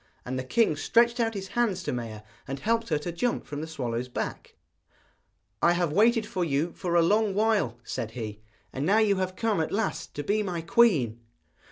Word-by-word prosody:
And 130 +1 -3
the - - -3
king 220 - +2
stretched 235 +9 +3
out 225 -1 +1
his 195 -1 -5
hands 210 -7 0
to - - -2
Maia, 115 -3 -5 0.2
and 135 0 -4
helped 230 +4 0
her 155 - +2
to 160 +4 -4
jump 235 +9 -1
from 145 0 -5
the 160 - -5
swallow's 125 -6 -3
back. 125 - -5 1.1
'I 170 - +5
have 175 -3 0
waited 225 +3 +4
for 185 -3 -2
you 155 +1 0
for 175 -1 -2
a 170 - +6
long 210 +2 +2
while,' 210 - +1
said 115 -1 -4
he, 105 -2 -5 0.3
'and 135 - -3
now 195 +7 +3
you 210 -3 +3
have 185 0 -2
come 220 -4 0
at 160 - -2
last 195 -6 -2
to 145 - -3
be 210 +8 +1
my 180 -5 -3
queen.' 165 - +3
175 Hz, 205 wpm, -27 LUFS, 140-215 Hz, 1.1 s, a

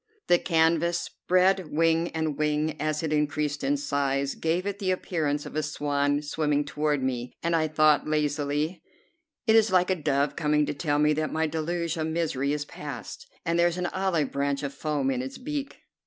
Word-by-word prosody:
The 175 - +4
canvas, 165 0 +2
spread 185 0 +1
wing 165 +2 +2
and 160 -2 -1
wing, 150 +1 0
as 155 +1 -1
it 155 -1 -1
increased 150 -1 0
in 140 +2 +2
size, 140 -1 0
gave 170 +3 -1
it 200 0 -3
the 190 -3 -1
appearance 155 -5 -1
of - - -8
a 155 - +1
swan 145 -1 0
swimming 150 -1 0
toward 150 -1 -1
me, 125 -1 -2
and 170 0 +1
I 160 -1 +2
thought 155 -1 +3
lazily: 150 +2 -1 0.6
"It 220 -2 +4
is 225 -1 +5
like 185 0 +3
a - - +3
dove 145 -3 0
coming 150 -2 +2
to - - -2
tell 145 0 0
me 150 +1 +4
that 155 +1 -1
my 160 0 +1
deluge 165 +1 -2
of 160 0 -1
misery 160 -4 -1
is 145 0 -2
past, 135 -9 -8 0.2
and 170 +1 +1
there 170 - +5
is 175 0 -2
an 180 - -1
olive 185 -7 0
branch 140 0 -1
of 140 -1 -3
foam 145 -2 -1
in 125 -1 -1
its 130 +1 -6
beak." 285 +1 -5
155 Hz, 195 wpm, -27 LUFS, 145-170 Hz, 0.6 s, is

